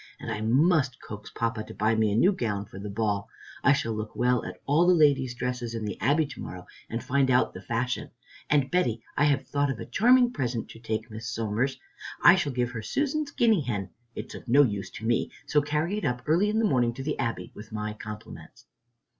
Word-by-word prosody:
And 115 - -5
I 110 -1 -3
must 135 +3 +3
coax 105 0 -9
Papa 115 -1 -2
to - - -11
buy 110 +2 +2
me 110 -1 +2
a - - 0
new 180 - +5
gown 105 - -2
for 95 -1 -11
the 105 +1 -6
ball. 100 -1 -1 0.3
I - - +6
shall 115 -5 +1
look 110 0 -5
well 125 0 +2
at - - -7
all 155 +5 +3
the 180 - +6
ladies' 140 -5 +3
dresses 125 -1 -3
at 115 - -3
the 105 -2 -4
Abbey 150 +4 +3
to 140 - -9
morrow 90 -1 -7 0.2
and 115 +1 -3
find 140 0 +2
out 125 0 +3
the - - -8
fashion. 120 +1 -2 0.4
And 140 -3 +2
Betty, 120 -11 +1
I 145 - +3
have 140 -2 +2
thought 145 0 0
of 135 - -3
a - - -5
charming 245 +2 +4
present 120 - -2
to 115 - -11
take 110 0 -4
Miss 110 +1 -7
Somers. 115 +2 -1 0.4
I 175 - +10
shall 185 -7 0
give 125 -1 -1
her 115 -3 -5
Susan's 290 - -1
guinea 225 - +3
hen. 105 -8 -3 0.2
It's - - -6
of - - -10
no 140 +5 +6
use 100 -6 -2
to 115 -3 -9
me, 120 0 +1
so 150 - +3
carry 155 +7 -1
it - - -10
up 125 0 -1
early 175 +7 +3
in 215 - 0
the 225 - +3
morning 120 - +2
to 135 - -6
the 150 +2 -3
Abbey, 115 - -3
with 110 +2 -11
my 105 0 -3
compliments." 105 +1 -10
125 Hz, 230 wpm, -27 LUFS, 110-145 Hz, 0.4 s, I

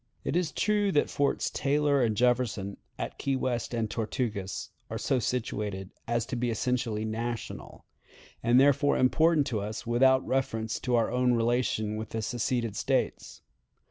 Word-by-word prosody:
It - - -2
is 175 -3 +1
true 205 +1 +1
that 145 - +2
Forts 140 -1 0
Taylor 145 0 +2
and 110 -4 +1
Jefferson, 120 -5 +1 0.2
at - - -5
Key 135 - 0
West 125 -3 -2
and 115 -2 -1
Tortugas, 105 -3 -3 0.2
are - - -3
so 130 - +1
situated 105 -6 -3 0.2
as 120 0 0
to 130 - -4
be 120 0 0
essentially 115 -1 -1
national, 115 +2 -5 0.6
and 120 +2 +4
therefore 145 +1 +4
important 155 +3 +4
to 115 -6 -1
us 110 +2 -5
without 130 +3 +4
reference 115 -4 -1
to 125 - 0
our 115 -1 +2
relations 120 -3 +1
with 110 - -6
the 110 -1 -3
seceded 115 -1 -1
States. - - -1
120 Hz, 150 wpm, -29 LUFS, 110-130 Hz, 0.6 s, and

